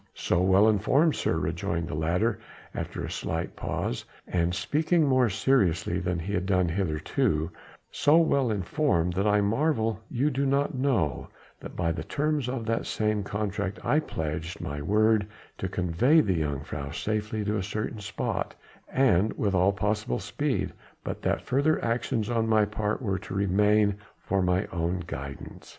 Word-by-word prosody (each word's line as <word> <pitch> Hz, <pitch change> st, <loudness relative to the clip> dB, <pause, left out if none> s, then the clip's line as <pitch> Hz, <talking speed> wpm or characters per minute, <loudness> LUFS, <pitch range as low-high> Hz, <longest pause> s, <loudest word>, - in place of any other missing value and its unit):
"So 90 Hz, -, +1 dB
well 95 Hz, +3 st, +5 dB
informed, 130 Hz, -, +3 dB
sir," -, -, 0 dB
rejoined 85 Hz, +1 st, -2 dB
the -, -, -5 dB
latter 90 Hz, +9 st, 0 dB, 0.3 s
after -, -, -4 dB
a -, -, -6 dB
slight -, -, -3 dB
pause, 60 Hz, -, -3 dB, 0.2 s
and 90 Hz, 0 st, 0 dB
speaking 160 Hz, -, +2 dB
more 130 Hz, -3 st, +3 dB
seriously 100 Hz, -6 st, +1 dB
than 90 Hz, -1 st, -1 dB
he 90 Hz, +5 st, -4 dB
had 90 Hz, -1 st, -1 dB
done 90 Hz, -2 st, +2 dB
hitherto, 80 Hz, -2 st, 0 dB, 0.4 s
"so 150 Hz, +2 st, +4 dB
well 140 Hz, -6 st, +3 dB
informed 95 Hz, -, +1 dB
that 100 Hz, +3 st, 0 dB
I 105 Hz, 0 st, +4 dB
marvel 115 Hz, -1 st, +1 dB
you 135 Hz, +4 st, +1 dB
do 140 Hz, +1 st, 0 dB
not 140 Hz, +2 st, +1 dB
know 125 Hz, -, 0 dB, 0.3 s
that -, -, -9 dB
by 85 Hz, -2 st, 0 dB
the 80 Hz, -, -3 dB
terms 150 Hz, -3 st, -1 dB
of 125 Hz, -3 st, -3 dB
that 115 Hz, 0 st, -1 dB
same 105 Hz, -1 st, 0 dB
contract 100 Hz, 0 st, -3 dB
I 150 Hz, -, +3 dB
pledged 80 Hz, -, -4 dB
my 75 Hz, 0 st, -4 dB
word 105 Hz, +4 st, +3 dB, 0.3 s
to 95 Hz, -, -2 dB
convey 90 Hz, -, +3 dB
the 95 Hz, -, +2 dB
jongejuffrouw 75 Hz, 0 st, -4 dB
safely 105 Hz, +1 st, -2 dB
to 105 Hz, +1 st, 0 dB
a -, -, -1 dB
certain 105 Hz, +3 st, -4 dB
spot 105 Hz, +1 st, -3 dB, 0.4 s
and 110 Hz, -6 st, +3 dB
with 100 Hz, -2 st, 0 dB
all 95 Hz, +1 st, +4 dB
possible 105 Hz, -8 st, -1 dB
speed, -, -, -2 dB, 0.3 s
but -, -, -5 dB
that -, -, 0 dB
further 140 Hz, +4 st, +2 dB
actions 115 Hz, -1 st, -1 dB
on 115 Hz, -1 st, 0 dB
my 110 Hz, -1 st, +4 dB
part 105 Hz, +3 st, -2 dB
were 95 Hz, -4 st, -1 dB
to 95 Hz, -, -7 dB
remain 100 Hz, +1 st, +3 dB, 0.2 s
for 100 Hz, 0 st, -1 dB
mine 90 Hz, +1 st, +1 dB
own 85 Hz, +1 st, -1 dB
guidance. 70 Hz, -5 st, -8 dB
105 Hz, 165 wpm, -27 LUFS, 90-115 Hz, 0.4 s, well